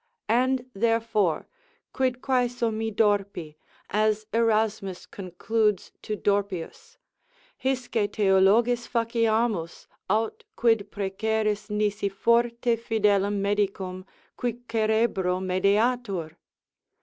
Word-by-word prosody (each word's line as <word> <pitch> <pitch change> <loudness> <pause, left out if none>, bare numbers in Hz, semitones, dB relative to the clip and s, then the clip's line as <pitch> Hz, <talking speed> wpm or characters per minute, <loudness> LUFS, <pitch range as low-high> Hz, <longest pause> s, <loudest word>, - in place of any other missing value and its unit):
And 255 +2 +2
therefore, 225 -4 +1 0.5
Quid 255 -1 -1
quaeso 245 -3 +1
mi 220 +1 -2
Dorpi, 200 -7 0 0.4
as 215 +1 +1
Erasmus 220 -4 0
concludes 205 +2 -1
to 215 - -3
Dorpius, 200 - -2 0.7
hisce 250 -5 0
Theologis 210 +5 +3
faciamus, 230 -6 0 0.2
aut 220 +2 0
quid 225 -3 +2
preceris, 210 +1 -1
nisi 210 -1 0
forte 235 +3 +2
fidelem 205 -3 +1
medicum, 195 -2 -1 0.3
qui 245 -1 -2
cerebro 215 -5 +1
medeatur? 200 -1 0
215 Hz, 85 wpm, -26 LUFS, 200-230 Hz, 0.7 s, Theologis